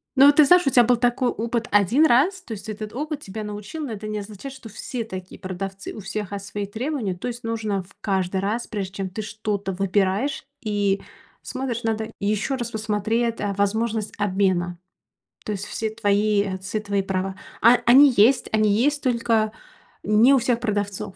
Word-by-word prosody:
Ну, 275 +1 +8
ты 305 - +7
знаешь, 355 +1 +5
у - - +6
тебя 245 -2 +6
был 245 +1 +3
такой 245 +1 +1
опыт 230 +1 -2
1 205 - +4
раз. 315 +8 +3
То 305 - -13
есть 215 0 -6
этот 215 0 -6
опыт 295 +3 -4
тебя 215 +3 -6
научил, 210 +9 -6
но 235 - -5
это 215 0 -6
не 215 0 -3
означает, 210 +6 -8
что 260 -4 -11
все 230 +2 -5
такие 185 -3 -8
продавцы, 190 +1 -6
у - - -8
всех, 205 0 -5
а, 200 - -3
свои 200 +1 -5
требования, 230 -2 -3
то 180 - -5
есть 240 0 -6
нужно 215 -4 -2
в 185 - -22
каждый 190 -1 0
раз, 215 +5 -2
прежде 195 -4 -4
чем 195 -1 -3
ты 210 +4 -5
что-то 210 -2 -3
выбираешь 195 +8 0 0.2
и 205 -4 0 0.4
смотришь, 255 -3 -4
надо 220 -1 -2
ещё 215 +6 0
раз 240 -2 -4
посмотреть, 220 +2 -1
а, 205 -1 -1
возможность 215 +2 -1
обмена. 185 -3 0 0.7
То 210 - -3
есть 200 0 -5
все 220 - -3
твои 210 -1 +2
отцы 195 +2 -3
твои 200 -1 0
права, 190 0 -2 0.3
а 235 +2 +8
а - - -3
они 265 +3 +7
есть, 235 +6 +4
они 215 -1 +3
есть, 285 +8 +2
только 230 -4 +1 0.5
не 220 +6 +5
у 275 - +6
всех 240 -1 +1
продавцов. 205 -3 -3
215 Hz, 190 wpm, -23 LUFS, 200-240 Hz, 0.7 s, Ну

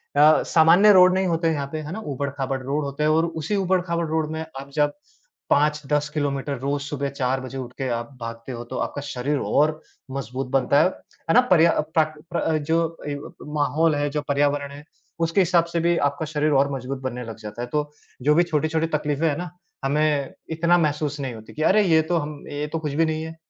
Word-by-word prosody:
अ, 150 +2 +6
सामान्य 170 +6 +7
रोड 185 0 +7
नहीं 190 0 +1
होते 165 0 +1
हैं 160 - +2
यहाँ 140 -1 -3
पे। 155 - -2
है 150 +2 -7
ना? 220 - -5
ऊबड़-खाबड़ 140 -1 -3
रोड 145 +3 -1
होते 140 +2 -3
हैं 155 - +3
और 160 +2 +3
उसी 165 +4 -3
ऊबड़-खाबड़ 180 -3 0
रोड 155 0 -1
में 160 0 -3 0.2
आप 140 +1 -9
जब 145 -1 +2 0.6
5-10 150 0 +2
किलोमीटर 140 -2 -2
रोज़ 140 +1 -1
सुबह 140 -1 -3
4 135 -1 -1
बजे 130 +1 -7
उठ 125 -2 -6
के 135 - -2
आप 120 +1 -3
भागते 115 +2 -6
हो 120 -1 -5
तो 130 +1 -6
आपका 145 - -3
शरीर 140 +1 -2
और 155 +1 +1 0.3
मज़बूत 130 0 -4
बनता 135 +1 +3
है। - - +4
है 165 - -6
ना? 250 - +7
पर्या 170 -2 +6
अ, - - +1
प्राकृत 155 0 -1
प्र 170 - 0
अ, 160 -1 +1
जो 165 +2 0
ए 145 - -2
ब 145 - -9
ब - - -10
माहौल 150 +2 +2
है 145 0 0
जो 150 +1 -2
पर्यावरण 140 0 +1
है 145 +1 -10 0.4
उसके 165 +4 +3
हिसाब 170 -1 +3
से 170 - +1
भी 170 +1 +2
आपका 145 +2 0
शरीर 150 0 0
और 140 0 +2
मजबूत 130 +1 -4
बनने 125 -1 -4
लग 115 -1 -8
जाता 105 +2 -7
है। 120 - -3
तो 150 0 -1 0.3
जो 150 +1 +4
भी 175 - +5
छोटी-छोटी 160 0 0
तकलीफें 150 +2 -1
हैं 145 - +1
ना 175 -1 -5 0.4
हमें 145 -1 +1 0.2
इतना 170 +2 +3
महसूस 150 -2 0
नहीं 135 -3 -3
होतीं 110 0 -12
कि 155 - -4
अरे! 210 +5 +5
ये 160 -4 +4
तो 170 +2 0
हम 150 -2 -5
ये 145 +1 -3
तो 165 - 0
कुछ 150 -3 -4
भी 165 +2 +3
नहीं 160 0 -2
है। 160 0 -7
150 Hz, 230 wpm, -23 LUFS, 140-160 Hz, 0.6 s, सामान्य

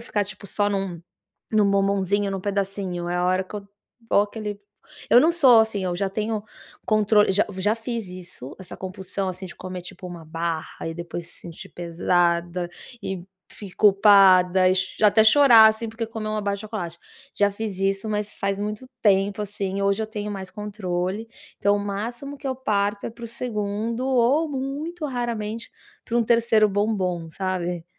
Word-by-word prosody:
ficar, 210 -3 -1
tipo, 200 +1 -9
só 205 +1 0
num 195 -4 -3 0.5
num 210 -2 +3
bombonzinho, 200 0 +1
num 195 -1 -3
pedacinho, 195 -3 -2
é 175 - -1
a 180 0 +1
hora 185 +1 +2
que 190 - -10
eu 200 -1 -7 0.4
vou - - +5
aquele 210 0 -5 0.5
eu 240 - +8
não 320 +6 +4
sou 260 -9 +7
assim, 220 -3 -2
eu 180 -1 -1
já 195 +1 -1
tenho 215 +1 -2 0.4
controle 215 -1 +4
já 205 +2 +2
já 205 +3 +2
fiz 230 -1 -4
isso, 180 -7 -10
essa 185 - -10
compulsão, 190 +1 -5
assim, 185 +1 -7
de 175 - -10
comer 185 -1 -7
tipo 180 +1 -10
1 175 -2 -9
barra 165 0 -4
e 165 - -4
depois 170 0 -6
se - - -12
sentir 170 -2 -10
pesada, 175 0 0 0.3
e, 190 -3 -5 0.2
fi 200 -3 -11
culpada 190 -2 +6
e 185 - +2
cho 185 +3 0
até 210 +1 +6
chorar, 230 -3 +8
assim, 220 +1 -1
porque 225 +1 -4
comeu 220 -1 -5
1 215 - -1
barra 200 -1 -1
de 200 - -9
chocolate. 190 -6 -6 0.3
Já 205 0 +3
fiz 205 -1 -5
isso, 195 +2 0
mas 210 0 -2
faz 200 -1 -2
muito 210 +4 -4 0.2
tempo, 200 0 +2
assim, 200 -1 -3
hoje 200 +2 +1
eu - - -5
tenho 210 -1 -5
mais 190 -2 -6
controle, 200 0 -3 0.3
então, 205 +1 +3
o - - -3
máximo 230 +8 -5
que 275 - -14
eu 260 - -1
parto 205 -5 -1
é - - -3
para 235 +1 -12
o - - -4
2º 225 0 -3
ou 265 +5 +3
muito 290 +5 -4
raramente 230 -4 -4 0.3
pra 235 - -1
um 235 - +3
3º 230 -2 +4
bombom, 190 -5 -1
sabe? 180 -1 -3
200 Hz, 180 wpm, -24 LUFS, 185-220 Hz, 0.5 s, eu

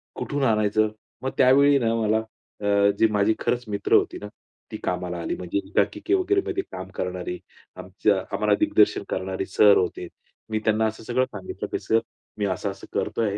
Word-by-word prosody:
कुठून 145 -1 -3
आणायचं?" 110 -2 +2 0.3
मग 130 - 0
त्यावेळी 140 +2 +6
ना 115 -1 +1
मला 110 0 +1 0.4
अ, 100 0 +3
जी 110 - +6
माझी 105 +1 +3
खरंच 125 0 -1
मित्र 100 -1 -2
होती - - +3
ना, 105 - -8 0.4
ती - - -5
कामाला 90 -1 -2
आली - - -2
म्हणजे 90 +2 -3
एकांकिके 320 +4 0
वगैरे 390 +1 +2
मध्ये 380 -1 -1
काम - - -7
करणारी. 360 -7 -4 0.4
आमचा - - 0 0.2
,आम्हाला - - +2
दिग्दर्शन 205 - +3
करणारे 95 0 -3
सर 100 +1 +5
होते. 90 -1 -2 0.4
मी 110 0 -1
त्यांना 110 0 +2
असं 110 +1 -6
सगळं 125 +3 +1
सांगितलं 100 -5 -7
की - - -1
"सर, 115 - +2 0.4
मी 105 - -1
असं-असं 95 +1 -4
करतोय." 105 -3 -1
110 Hz, 170 wpm, -24 LUFS, 100-130 Hz, 0.4 s, त्यावेळी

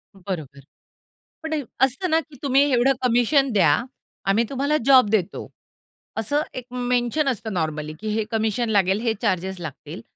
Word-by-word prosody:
बरोबर. 170 -8 -6 0.8
पण 320 0 -3 0.3
असतं 270 +8 +1
ना, 320 0 +4
की 310 -2 -11
तुम्ही 275 -1 +4
एवढं 255 +2 +4
कमिशन 250 +3 +3
द्या 165 -6 +4 0.5
आम्ही 210 +4 +3
तुम्हाला 280 +3 0
जॉब 260 -6 +6
देतो, 205 -4 -1 0.7
असं 255 +7 0
एक 255 - -6
मेन्शन 245 +3 0
असतं 220 -3 -3
नॉर्मली, 155 -3 -2
की 215 - -6
हे 220 - +1
कमिशन 225 +1 0
लागेल 195 -2 +2
हे 230 -2 +1
चार्जेस 190 -3 -1
लागतील 150 -5 -8
225 Hz, 150 wpm, -23 LUFS, 190-265 Hz, 0.8 s, जॉब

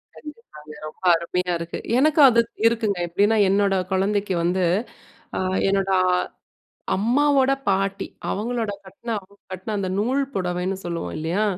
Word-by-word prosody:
கண்டிப்பாங்க. 190 - -12 0.2
ரொம்ப 155 - -13
அருமையா 180 +2 -2
இருக்கு. 170 0 -5 0.2
எனக்கு 310 +2 +3
அது 235 -1 +4 0.3
இருக்குங்க, 220 -4 0
எப்படின்னா, 205 +6 +2
என்னோட 200 0 +2 0.2
குழந்தைக்கு 195 0 0
வந்து, 180 +1 +1 0.7
அ - - 0 0.3
என்னோட 195 0 +1 0.2
அ 180 - +3 0.8
அம்மாவோட 270 +5 +3 0.2
பாட்டி, 195 0 0 0.2
அவங்களோட 225 +1 -2
கட்ன 195 +5 -10
அவங்க 200 +1 -21 0.2
கட்ன 190 +4 -5
அந்த 190 -2 -2
நூல் 260 +6 +1
புடவைன்னு 180 +1 -2
சொல்லுவோம் 170 - -4
இல்லையா? 170 +7 -1
195 Hz, 130 wpm, -23 LUFS, 180-225 Hz, 0.8 s, அது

